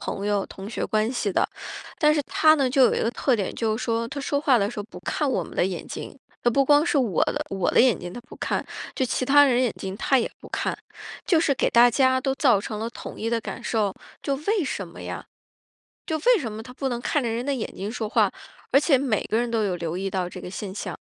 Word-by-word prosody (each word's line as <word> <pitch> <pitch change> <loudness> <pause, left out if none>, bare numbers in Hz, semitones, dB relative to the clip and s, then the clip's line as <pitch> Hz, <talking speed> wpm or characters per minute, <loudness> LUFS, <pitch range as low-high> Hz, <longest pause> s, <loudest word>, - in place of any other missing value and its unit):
朋 200 - -4
友、 205 -2 +1
同 195 +1 -9
学 235 - -3
关 215 +2 +1
系 215 -5 -1
的。 - - +2 0.5
但 300 -2 +4
是 295 - +1
他 310 +2 +4
呢， 275 -4 +1
就 270 0 +4
有 - - +4
一 - - 0
个 230 - +1
特 245 0 +1
点， 195 - -3
就 220 -2 0
是 245 - -4
说 230 0 -1
他 285 - -6
说 285 +1 -1
话 270 -4 +4
的 200 +2 0
时 215 - -8
候 - - -6
不 210 - -11
看 275 - -1
我 190 -8 0
们 - - -12
的 - - +2
眼 185 -3 -5
睛。 - - -8 0.2
他 240 - +3
不 275 +3 +3
光 290 +2 +5
是 315 - +1
我 230 - +2
的 - - -2
我 195 -2 0
的 - - +2
眼 245 -8 +4
睛 175 - -7
他 - - -6
不 250 - -13
看， - - -2 0.3
就 260 - 0
其 255 +1 -1
他 290 +2 +7
人 255 -4 +3
的 - - +3
眼 245 - +2
睛 190 0 -5
他 270 - +3
也 230 - -1
不 - - -12
看。 - - -2 0.5
就 335 - +4
是 310 -3 +2
给 - - +1
大 240 +1 +6
家 260 +1 +3
都 270 0 0
造 255 -8 +4
成 210 +1 -5
了 225 - -2
统 - - -9
一 225 - -1
的 235 0 +1
感 - - -6
受， 210 -4 0 0.3
就 280 - 0
为 410 -6 +2
什 195 -8 -4
么 170 - -11
呀？ - - -6 0.8
就 315 - -1
为 485 +9 +4
什 230 -6 -4
么 215 +1 -6
他 250 +2 -11
不 270 +1 -2
能 240 -1 -2
看 275 +3 0
着 235 - -1
人 235 +3 -2
的 285 - 0
眼 230 - -4
睛 200 +2 -4
说 220 -3 -3
话， - - +3 0.4
而 275 - +6
且 285 -2 +4
每 250 -6 0
个 220 - -1
人 240 0 -1
都 225 -2 +1
有 190 -3 0
留 170 0 -3
意 195 +1 -2
到 185 -2 -1
这 180 - -9
个 180 - -7
现 195 -1 -6
象。 - - -5
240 Hz, 300 characters per minute, -25 LUFS, 205-275 Hz, 0.8 s, 他